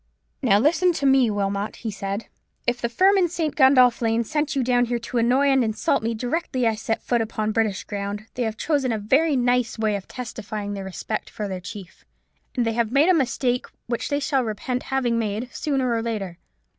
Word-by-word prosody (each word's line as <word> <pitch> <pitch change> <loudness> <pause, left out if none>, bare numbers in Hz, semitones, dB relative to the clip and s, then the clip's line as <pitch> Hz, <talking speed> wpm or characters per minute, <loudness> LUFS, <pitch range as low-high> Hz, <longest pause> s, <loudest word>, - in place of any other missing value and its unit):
"Now, 200 - +4
listen 340 - +3
to 280 - -2
me, 265 -3 +5
Wilmot," 200 0 -2
he 225 - -5
said. 200 +1 -4 0.4
"If 245 0 0
the 235 - 0
firm 385 +10 +4
in 360 - +3
St. 320 -3 -2
Gundolph 255 -4 +5
Lane 230 0 +1
sent 300 +5 -1
you 270 - +1
down 245 0 +3
here 240 0 -1
to 235 +1 -3
annoy 255 +5 +3
and 265 -2 +4
insult 220 -1 0
me 225 +1 -1
directly 250 +1 -1
I 225 - +3
set 225 +1 -3
foot 240 -2 +1
upon 215 -1 -2
British 215 -3 0
ground, 205 0 -5
they 250 - -4
have 220 -2 -1
chosen 280 -4 0
a 225 - 0
very 275 +9 +2
nice 245 -2 +1
way 215 -2 +1
of 195 - -6
testifying 215 -4 -5
their 195 -1 -5
respect 190 +3 -4
for 210 - -5
their 185 -2 -5
chief: 185 -1 -10 0.5
and 245 -3 +1
they 225 - 0
have 230 -1 0
made 285 +7 +4
a - - +6
mistake 250 -4 0 0.2
which 235 -1 -3
they 285 -1 +1
shall 275 -2 +1
repent 245 +3 -3
having 250 -3 +1
made 220 +3 -3
sooner 265 -5 0
or 230 - 0
later. 200 -6 -4
235 Hz, 210 wpm, -23 LUFS, 215-265 Hz, 0.5 s, a